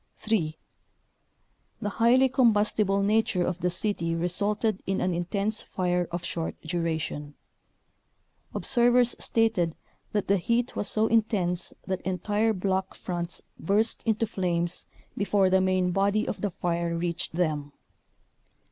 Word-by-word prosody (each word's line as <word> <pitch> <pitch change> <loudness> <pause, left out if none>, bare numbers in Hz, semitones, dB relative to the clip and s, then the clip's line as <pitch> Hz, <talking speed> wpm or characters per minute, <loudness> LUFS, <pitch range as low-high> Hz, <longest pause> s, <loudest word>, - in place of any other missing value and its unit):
3. 170 -8 -1 1.2
The 210 - -2
highly 240 +5 +4
combustible 215 -5 +2
nature 205 -3 +2
of 180 0 -2
the 180 - +1
city 175 -3 -1
resulted 200 +5 0
in 195 - 0
an 180 0 0
intense 200 +5 -1
fire 180 -1 -1
of 175 0 -4
short 165 -1 -4
duration. 160 -3 -3 1.2
Observers 245 0 +3
stated 185 -8 +1 0.4
that 205 -2 -1
the 200 - +4
heat 235 +7 0
was - - +1
so 215 0 +2
intense 205 -6 +1
that 190 -1 -2
entire 205 +5 0
block 190 -1 -1
fronts 175 -2 -4 0.2
burst 210 +6 +1
into 220 0 +2
flames 175 -4 -1 0.3
before 200 -2 +2
the 190 0 +4
main 185 -1 +2
body 200 +3 +1
of - - -4
the 205 - 0
fire 170 -1 -2
reached 170 -1 -2
them. 155 -4 -1
190 Hz, 130 wpm, -27 LUFS, 175-215 Hz, 1.2 s, highly